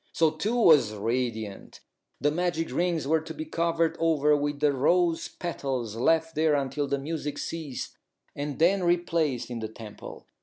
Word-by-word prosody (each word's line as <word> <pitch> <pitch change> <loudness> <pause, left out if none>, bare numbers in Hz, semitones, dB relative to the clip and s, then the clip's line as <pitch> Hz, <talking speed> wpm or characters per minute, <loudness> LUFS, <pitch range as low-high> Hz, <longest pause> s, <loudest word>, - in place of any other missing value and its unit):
So 160 -2 +3
Two 205 +9 -2
was 150 - +5
radiant. 110 -2 -3 0.4
The 145 - +2
magic 170 0 -1
rings 170 -4 0
were 160 +1 +3
to 160 +1 -8
be 155 - -5
covered 165 0 0
over 150 -2 +3
with 145 0 -2
the 145 -1 +3
rose 165 +5 +2
petals, 130 -10 -4
left 160 +7 +2
there 155 -1 +2
until 140 +1 -1
the 140 0 0
music 145 0 -4
ceased, 155 -6 -5 0.4
and 145 -1 -4
then 185 +4 +3
replaced 165 -7 0
in 120 - -4
the 110 - -3
temple. 110 -1 -10
150 Hz, 160 wpm, -27 LUFS, 135-165 Hz, 0.4 s, was